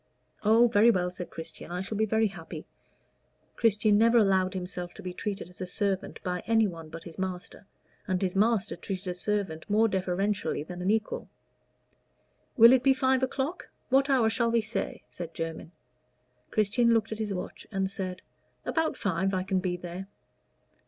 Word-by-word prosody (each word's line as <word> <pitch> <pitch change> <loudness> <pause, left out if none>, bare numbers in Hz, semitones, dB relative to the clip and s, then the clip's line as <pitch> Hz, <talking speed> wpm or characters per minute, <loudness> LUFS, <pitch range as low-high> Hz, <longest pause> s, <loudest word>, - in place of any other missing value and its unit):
"Oh, 225 +3 +6
very 225 0 +5
well," 180 -5 +2
said 180 0 -6
Christian. 165 - -8
"I 180 +1 -3
shall 200 +3 -4
be 220 +1 +1
very 220 +1 +2
happy." 165 -4 -9 0.9
Christian 215 -2 +3
never 230 +1 +5
allowed 190 -3 +3
himself 180 -1 -5
to 205 - -10
be 180 -1 -5
treated 200 -1 -4
as 180 +1 -14
a 185 - -3
servant 195 0 -2
by 180 -1 -2
anyone 200 -8 +1
but 165 +1 -9
his 170 +1 -11
master, 185 +1 -5 0.4
and 185 -2 +1
his 185 -1 -1
master 215 0 +2
treated 195 -1 -5
a - - -1
servant 190 -3 -2
more 215 +2 +4
deferentially 190 -3 -1
than 180 +2 -8
an 185 - 0
equal. 220 +1 -1 1.3
"Will 235 +1 +9
it 260 - +5
be 270 0 +4
five 260 0 +2
o'clock? 270 +6 -2 0.2
what 270 +2 +4
hour 255 -5 +4
shall 230 +1 +1
we 230 0 +3
say?" 220 +2 -4
said 170 -2 -8
Jermyn. 165 0 -5 0.8
Christian 230 +3 +3
looked 225 0 0
at 220 - -4
his 215 -2 -2
watch 180 -2 -6
and 195 -2 0
said, 185 -2 -5 0.4
"About 320 -4 0
five 190 0 0
I 185 - 0
can 190 0 0
be 180 -1 -2
there." 180 +2 -7
200 Hz, 175 wpm, -28 LUFS, 180-225 Hz, 1.3 s, Will